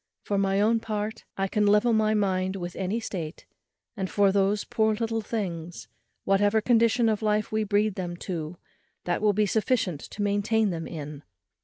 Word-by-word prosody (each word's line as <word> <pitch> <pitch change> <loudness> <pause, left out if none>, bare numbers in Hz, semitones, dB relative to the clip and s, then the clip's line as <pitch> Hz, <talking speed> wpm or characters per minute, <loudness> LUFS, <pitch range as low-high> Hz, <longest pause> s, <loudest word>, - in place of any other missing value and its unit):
For 200 -1 0
my 195 0 +1
own 225 +2 +3
part, 215 -1 -4
I 195 0 0
can 210 +1 +1
level 210 +3 +4
my 215 0 +3
mind 190 -2 0
with 175 -2 -5
any 195 +4 -1
state; 175 -8 -6 0.5
and 190 -3 -3
for 200 -1 +3
those 200 +1 +2
poor 220 -1 +1
little 225 0 -1
things, 175 -6 -5 0.3
whatever 205 +2 +3
condition 230 +1 +3
of 215 -1 +1
life 210 -1 0
we 220 0 +1
breed 210 0 +1
them 175 -2 -5
to, 170 -2 -4 0.5
that 175 +1 -1
will 210 -1 +3
be 210 +1 +2
sufficient 205 - 0
to 205 - -5
maintain 205 +1 +1
them 165 -1 -4
in. 150 -3 -7
205 Hz, 175 wpm, -26 LUFS, 185-220 Hz, 0.5 s, level